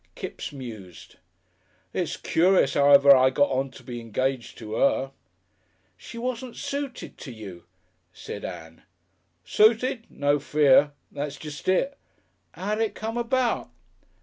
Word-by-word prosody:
Kipps - - -6
mused. 110 - -10 0.8
"It's - - -2
curious 180 -4 +3
'ow 140 0 +4
ever 140 0 +8
I 130 0 +5
got 145 +2 +2
on 135 +1 0
to 130 - -15
be 120 -1 -7
engaged 130 +2 -2
to 110 -1 -6
'er." 135 +1 +2 0.8
"She 235 - -11
wasn't 245 0 -4
suited 280 -2 -5
to 130 - -8
you," 100 -7 -10 0.5
said - - -8
Ann. 80 0 -8 0.6
"Suited. 230 +2 +3
No 145 0 +1
fear! 145 0 +4 0.2
That's 145 0 -5
jest 150 -2 -9
it. 270 +10 +1 0.6
'Ow 205 +3 -3
did 220 +1 +1
it 215 - -7
come 225 +1 -4
about?" 240 0 0
145 Hz, 135 wpm, -25 LUFS, -, 0.8 s, ever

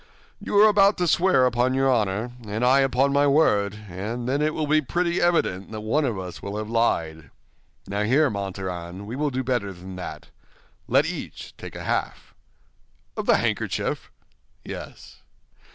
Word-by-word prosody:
"You - - -3
are 215 - +8
about 205 -1 +4
to 180 - 0
swear 175 -5 +4
upon 125 +1 +1
your 135 0 +2
honor 110 -2 +1 0.2
and 110 +4 -1
I 130 +2 +5
upon 135 +1 +2
my 145 0 +4
word, 105 -8 +2
and 105 +7 -5
then 140 +3 0
it 155 0 0
will 155 - -1
be 155 +1 +3
pretty 170 +4 -1
evident 130 - +1
that 110 -1 -6
one 130 +8 +1
of 115 -6 -1
us 90 -2 -7
will 100 +1 -5
have 110 +1 -5
lied. 80 - 0 0.6
Now, 100 +1 -2
here, 135 +6 +3
Montaran, 95 -2 -5
we 115 +4 -6
will 150 +2 0
do 130 -1 -2
better 120 -6 -1
than 95 0 -10
that—let 90 - -4
each - - -7
take - - -10
a - - -6
half." - - -3 0.8
"Of - - -4
the - - +5
handkerchief?" - - -2 0.6
"Yes." - - -9
120 Hz, 170 wpm, -24 LUFS, 100-145 Hz, 0.8 s, are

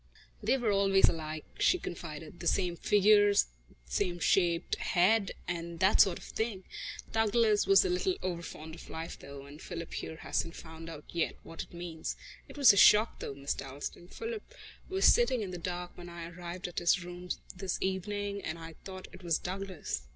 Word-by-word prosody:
"They 270 - +2
were 235 -5 +1
always 195 -1 +5
alike," 155 -1 -4
she 365 - +4
confided, 165 - -7
"the 170 - -3
same 180 0 +2
figures, 205 +2 +5 0.4
same 125 - -1
shaped 175 -1 +2
head 195 +3 +3
and 170 -1 -4
that 190 +3 +6
sort 185 -3 +4
of - - -12
thing. 220 -4 -3 0.5
Douglas 220 -1 +3
was 390 0 +7
a - - +1
little 365 +1 +1
overfond 170 -3 -5
of 165 - -11
life, 165 +1 -6
though, 140 0 -10
and 145 +2 -12
Philip 170 -1 -6
here 160 - -4
hasn't 165 +1 -2
found 160 0 -9
out 150 -2 -9
yet 170 -1 -1
what 165 - -7
it - - -9
means. 170 -2 -4 0.3
It - - -12
was 275 -7 +8
a - - -1
shock, 210 +3 +6
though, 140 - -5
Miss 140 +1 -2
Dalstan. 145 +5 -7
Philip 455 - -6 0.3
was 385 +1 +1
sitting 240 0 +5
in 195 -3 -4
the 180 - -5
dark 180 0 -4
when 175 0 -9
I 170 -1 -7
arrived 175 +1 -6
at 175 - -3
his 175 +1 +3
rooms 180 0 -5 0.2
this 185 0 -2
evening, 200 +1 -2
and 160 - -3
I 165 0 -9
thought 185 -1 -8
it 185 - -11
was 170 -3 +1
Douglas." 185 - -4
180 Hz, 185 wpm, -31 LUFS, 165-205 Hz, 0.5 s, was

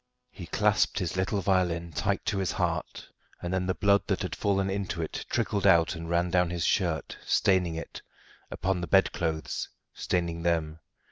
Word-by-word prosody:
He - - -9
clasped - - +2
his - - -2
little 95 +2 0
violin 85 -3 0
tight - - -1
to 100 - 0
his 95 -3 -1
heart, - - -2 0.3
and 90 +1 -4
then 95 0 0
the 95 - 0
blood 100 0 +3
that - - 0
had - - -3
fallen 95 -1 +1
into 95 -3 -3
it 80 - -4
trickled 100 -1 0
out 85 -2 +5
and 85 0 -7
ran 85 +1 +1
down 90 -1 +3
his 85 -2 -2
shirt, 85 -5 0
staining 90 -4 +2
it 80 - -7 0.5
upon 95 -1 -1
the 85 - -3
bedclothes, 85 -4 +1 0.2
staining 85 -2 -2
them. 80 -2 0
90 Hz, 175 wpm, -28 LUFS, 85-95 Hz, 0.5 s, out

